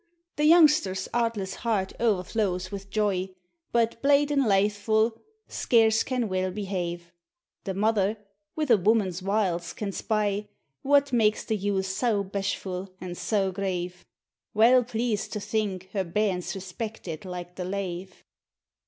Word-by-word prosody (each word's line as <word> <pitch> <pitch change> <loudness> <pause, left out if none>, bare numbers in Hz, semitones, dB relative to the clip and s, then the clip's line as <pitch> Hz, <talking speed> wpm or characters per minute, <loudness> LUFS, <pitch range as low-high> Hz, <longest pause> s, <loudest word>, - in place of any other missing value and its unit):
The 300 - +1
youngster's 300 - +5
artless 230 -5 -1
heart 210 -5 0
o'ertlows 190 -3 0
wF 195 0 -7
joy, 195 -3 0 0.4
But 230 -1 +1
blate 285 +1 +4
and 275 -4 +2
lathefu', 210 +3 +2 0.4
scarce 225 -2 +3
can 250 -3 -1
weel 185 -1 -1
be 200 +2 -5
have; 175 -3 -4 0.5
The 190 - -3
mother, 210 0 +1 0.4
wi' 310 - 0
a 225 - +7
woman's 195 -2 +1
wiles, 185 -3 0
can 205 -2 -4
spy 210 0 -1 0.3
What 285 -1 +3
makes 215 -2 +2
the 220 - 0
youth 200 -1 -1
sae 210 +5 0
bashfu' 195 -1 -3
an' 180 -1 -6
sae 195 +1 0
grave; 180 -2 -3 0.5
Weel 245 +4 +6
pleased 230 -2 -2
to 210 - -2
think 195 -3 -2
her 195 -2 0
bairn's 185 +1 -1
respected 190 -3 -6
like 180 -1 -7
the 180 0 -5
lave. 185 -1 -5
200 Hz, 135 wpm, -27 LUFS, 185-225 Hz, 0.5 s, a